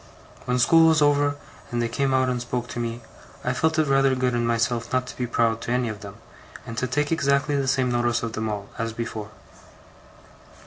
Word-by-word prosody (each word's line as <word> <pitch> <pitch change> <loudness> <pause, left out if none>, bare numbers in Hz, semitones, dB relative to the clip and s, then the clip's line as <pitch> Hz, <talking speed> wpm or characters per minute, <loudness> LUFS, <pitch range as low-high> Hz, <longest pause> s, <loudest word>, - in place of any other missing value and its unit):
When 125 0 0
school 165 +6 +6
was 160 -2 +4
over, 145 0 +3 0.3
and 120 - -2
they 120 - +1
came 135 +4 0
out 130 0 +3
and 125 -1 -1
spoke 120 0 -3
to - - -5
me, 120 0 -3 0.4
I 125 - 0
felt 160 +5 +1
it 155 - +3
rather 135 -1 +3
good 125 -1 0
in 120 -1 0
myself 115 0 0
not 130 0 +1
to - - -9
be 125 - -2
proud 115 -1 +1
to 115 - -4
any 125 -1 +1
of 105 -1 -6
them, 100 -2 -9 0.5
and 115 - -7
to 130 - -1
take 145 +5 -1
exactly 140 -2 +1
the 135 -1 0
same 130 -1 +1
notice 120 -1 +1
of 115 -1 -3
them 110 0 -2
all, 100 -1 -5
as 115 0 -2
before. 110 -2 -5
125 Hz, 220 wpm, -24 LUFS, 115-135 Hz, 0.5 s, school